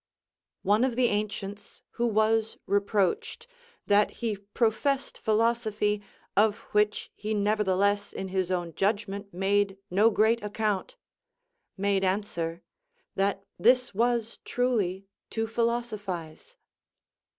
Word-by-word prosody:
One 210 +4 +3
of 260 -3 +1
the 245 -1 +3
ancients, 205 -1 -4
who 240 0 0
was 220 0 +2
reproached, 200 -2 0 0.4
"That 205 0 +4
he 230 -3 -3
professed 230 +7 0
philosophy, 215 -2 +1 0.3
of 210 +1 +4
which 210 0 +1
he 215 +1 -3
nevertheless 205 -1 +1
in 190 - -5
his 185 -1 -1
own 175 -3 -2
judgment 200 0 -1
made 195 +2 +1
no 205 +5 +5
great 225 +2 +3
account," 210 - -2 0.8
made 200 0 +1
answer, 180 -4 -1 0.5
"That 195 0 0 0.2
this 250 +5 +4
was 235 +1 0
truly 205 -7 0 0.2
to 225 0 -1
philosophize." 225 - -3
210 Hz, 105 wpm, -28 LUFS, 195-225 Hz, 0.8 s, no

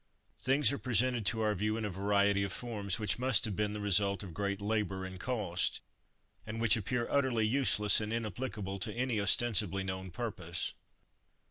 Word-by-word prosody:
Things 135 +2 +4
are 140 - -3
presented 120 -1 +2
to 110 -1 0
our 105 -1 +1
view, 105 +3 -1
in 110 - -3
a 105 - -3
variety 100 +1 +2
of 100 -1 -2
forms, 105 -6 -1
which 105 +1 0
must 125 -3 +3
have 105 -3 -3
been 105 +1 -1
the 105 - -5
result 100 -1 +2
of 90 -4 -9
great 100 +2 -2
labour 100 -2 -2
and 95 0 -8
cost, 100 -5 -1 0.6
and 110 +2 -6
which 115 -2 +5
appear 120 +2 -2
utterly 130 -6 +1
useless 110 -4 +3
and 105 0 -4
inapplicable 105 -3 -4
to - - -3
any 120 -3 -1
ostensibly 100 -2 +2
known 95 0 -5
purpose. 90 -4 -4
105 Hz, 175 wpm, -32 LUFS, 100-115 Hz, 0.6 s, which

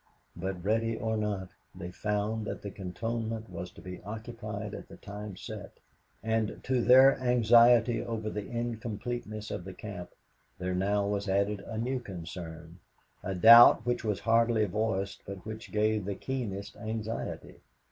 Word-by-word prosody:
But 90 0 -4
ready 115 +2 +1
or 110 0 -1
not, 105 -3 -2 0.3
they 90 -1 -7
found 105 +2 -2
that - - -5
the 100 - -5
cantonment 110 +3 -4
was 90 +1 -6
to - - -13
be 90 0 -8
occupied 110 -1 -6
at - - -8
the - - -12
time 105 -1 -8
set, 100 0 -8 0.5
and 110 -1 0
to 130 -1 +1
their 130 +3 +7
anxiety 120 -1 +5
over 110 -2 -4
the 105 -1 -5
incompleteness 115 -2 -4
of - - -4
the 95 +1 -9
camp, 100 -5 -7 0.5
there 90 0 -2
now 100 +2 +1
was 100 0 -2
added 100 +1 +1
a 110 +2 -7
new 125 +3 -1
concern 85 -4 -8 0.4
a 95 0 -3
doubt 115 +5 +9
which 120 -1 0
was 105 -5 -1
hardly 115 -1 +3
voiced 100 -1 -2
but 100 -2 -8
which 110 +1 -7
gave 105 -1 +1
the 100 0 -3
keenest 105 -5 -4
anxiety. 110 0 -5
105 Hz, 155 wpm, -30 LUFS, 100-115 Hz, 0.5 s, doubt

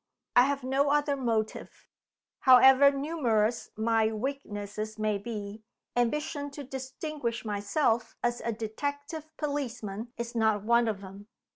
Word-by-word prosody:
I 245 - +7
have 280 -1 -1
no 270 +2 +2
other 290 0 +2
motive. 225 -5 -3 0.5
However 265 +2 +8
numerous 255 -6 0
my 220 0 +2
weaknesses 215 -4 -4
may 215 -1 0
be, 210 -1 -6 0.3
ambition 285 +4 0
to 290 - -5
distinguish 265 -2 -5
myself 220 +3 0
as 240 0 0
a 235 - -1
detective 285 +8 -5
policeman 235 -7 -4
is 235 0 -4
not 220 -3 +2
one 235 +1 +3
of 205 -3 -2
them. 195 +1 -11
235 Hz, 125 wpm, -29 LUFS, 215-280 Hz, 0.5 s, However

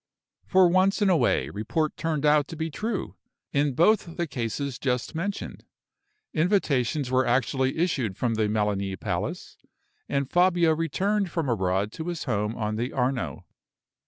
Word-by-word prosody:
For 185 -1 +5
once 185 +3 +3
in 195 - +4
a - - +5
way, - - +2
report 150 +10 -1
turned 155 -3 -1
out 150 -1 +4
to - - -7
be 160 0 -3
true, 215 +5 -4 0.4
in 140 -2 +1
both 175 - +2
the 170 - 0
cases 135 -1 -3
just 125 0 -1
mentioned. 195 +5 -4 0.7
Invitations 150 - +1
were 130 0 +2
actually 130 +2 +1
issued 135 - 0
from 120 0 0
the 110 -1 +1
Melani 100 -3 -1
Palace, - - -4 0.5
and 140 -1 0
Fabio 175 0 +3
returned 190 +5 0
from 165 -3 -2
abroad 95 -2 0
to 160 +7 -6
his 175 -2 -3
home 110 -3 -1
on 110 -1 -2
the 120 +3 -2
Arno. 125 - -2
140 Hz, 155 wpm, -26 LUFS, 115-170 Hz, 0.7 s, For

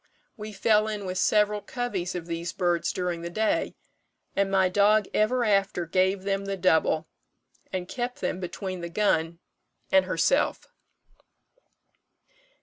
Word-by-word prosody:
We 215 0 -7
fell 215 +1 +2
in 210 -2 -4
with 185 0 -3
several 210 -1 +2
coveys 205 -9 -3
of 175 -2 -4
these 170 0 -4
birds 175 -2 0
during 180 -2 -3
the 170 - -5
day, 215 +5 0 0.6
and 200 0 +1
my 190 -1 +3
dog 205 +3 +4
ever 240 +3 +2
after 195 -4 +1
gave 185 +3 +1
them 195 0 -1
the 195 0 -3
double, 160 -3 +2 0.6
and 185 -1 -3
kept 245 +2 -4
them 180 - -2
between 185 0 -5
the 170 - -5
gun 170 -3 +1 0.5
and 190 -1 +5
herself." 185 - +1
190 Hz, 140 wpm, -26 LUFS, 175-210 Hz, 0.6 s, and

